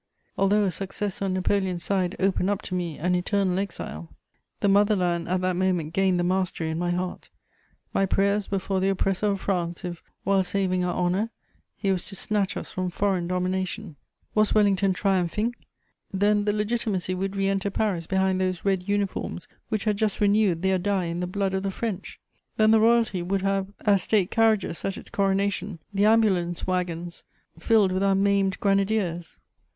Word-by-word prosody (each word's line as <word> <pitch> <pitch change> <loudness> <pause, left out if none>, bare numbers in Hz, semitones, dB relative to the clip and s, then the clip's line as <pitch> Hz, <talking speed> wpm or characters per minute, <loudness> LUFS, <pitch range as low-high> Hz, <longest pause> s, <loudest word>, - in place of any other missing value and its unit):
Although 205 +2 +3
a 195 - +1
success 195 +2 -4
on 195 -1 0
Napoleon's 185 -2 0
side 185 -2 0
opened 190 0 +1
up 205 -1 -1
to - - -6
me 175 -4 -2
an 180 +3 0
eternal 185 +1 +1
exile, 85 - -5 0.5
the - - +1
mother 205 +2 +4
land 175 -3 0
at 185 0 +1
that 185 0 0
moment 180 -4 0
gained 190 -1 +2
the - - +1
mastery 180 -3 -1
in 160 - -3
my 175 0 -1
heart; 180 +1 -3 0.6
my 195 - +2
prayers 200 +2 +1
were 195 - 0
for 190 0 -1
the 190 +1 +1
oppressor 195 +1 0
of 200 -1 -1
France, 175 -2 -2
if, 175 -2 -5 0.2
while 195 0 +3
saving 185 -1 0
our 180 - -1
honour, 180 +5 0 0.5
he 195 - 0
was 185 -2 -1
to 195 - -7
snatch 205 0 -1
us - - -6
from 185 0 -2
foreign 185 -1 0
domination. 185 0 -2 0.4
Was 215 0 +2
Wellington 200 -2 +3
triumphing? 195 +4 0 0.6
Then 205 +1 +2
the 210 - +2
Legitimacy 210 -3 -1
would 195 +2 -3
re 195 0 +1
enter 195 0 0
Paris 190 -5 -1
behind 190 -1 +1
those 185 -1 -2
red 190 -1 0
uniforms 200 -3 -2 0.2
which 215 -2 -1
had 210 -2 0
just 215 -1 0
renewed 205 -4 +2
their 190 -1 +2
die 195 -1 0
in 170 +1 -3
the 180 - -2
blood 195 +1 -1
of 190 - 0
the 195 - -2
French! 200 -1 -5 0.4
Then 215 0 +5
the 220 - +6
royalty 225 -4 +3
would 190 +2 -1
have 195 -1 0
as 200 -3 +3
state 200 -1 +1
carriages 220 -6 +2
at 195 - -2
its - - -11
coronation 195 -1 0 0.2
the 200 +1 +2
ambulance 190 -6 +2
waggons 175 -2 -3 0.4
filled 205 +1 +3
with 185 +1 0
our 195 0 +3
maimed 195 0 +2
grenadiers! 195 -4 0
195 Hz, 185 wpm, -25 LUFS, 180-200 Hz, 0.6 s, the